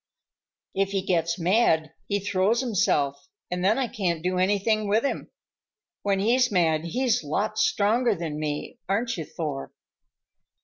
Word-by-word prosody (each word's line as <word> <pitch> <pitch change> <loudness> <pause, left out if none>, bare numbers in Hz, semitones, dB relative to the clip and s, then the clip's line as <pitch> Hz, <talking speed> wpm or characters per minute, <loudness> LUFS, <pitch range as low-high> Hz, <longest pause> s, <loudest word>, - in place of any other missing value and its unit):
"If 195 0 0
he 195 -1 0
gets 170 -3 0
mad 170 -4 +2
he 205 - 0
throws 205 +4 +1
himself, 145 - 0 0.2
and 180 0 -2
then 205 +4 +3
I 265 -2 0
can't 175 -7 -2
do 180 0 0
anything 205 +3 +1
with 215 +3 +2
him. - - -2 0.7
When 200 -1 +1
he's 245 +4 +3
mad 165 -4 +2
he's 245 +5 0
lots 215 +9 -1
stronger 225 +2 +2
than 160 -3 -4
me, 150 -1 -4
aren't 230 +4 0
you, 160 - -5
Thor?" 145 -5 -5
195 Hz, 145 wpm, -26 LUFS, 165-215 Hz, 0.7 s, then